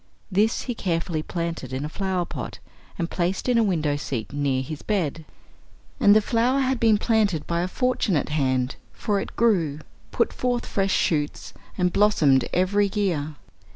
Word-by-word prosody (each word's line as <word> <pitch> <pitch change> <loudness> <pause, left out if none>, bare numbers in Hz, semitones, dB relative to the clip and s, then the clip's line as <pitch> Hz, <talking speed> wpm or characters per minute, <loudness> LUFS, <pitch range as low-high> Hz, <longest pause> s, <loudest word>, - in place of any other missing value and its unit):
This 210 +4 +2
he 245 - -3
carefully 165 -6 -2
planted 165 -5 -4
in 130 +3 -3
a - - -2
flower 185 +1 -2
pot, - - -6 0.4
and 170 -4 -1
placed 180 +5 -2
in 245 -2 +3
a - - +4
window 160 -8 +1
seat 130 -4 -4
near 140 -2 0
his 150 +2 -7
bed. 165 -7 -2 0.7
And 205 0 +6
the 215 - +6
flower 250 +4 +2
had 260 -1 0
been 220 -2 +4
planted 205 -8 +1
by 170 0 -1
a 180 - -1
fortunate 205 - 0
hand, 130 -3 0 0.2
for 205 -2 -1
it - - -6
grew, 180 -11 +2 0.3
put - - 0
forth 245 -1 -1
fresh 195 -1 0
shoots, 150 -5 0 0.2
and 180 -1 +1
blossomed 155 -11 +4
every 200 +3 +2
year. 160 -8 -1
180 Hz, 165 wpm, -24 LUFS, 150-210 Hz, 0.7 s, And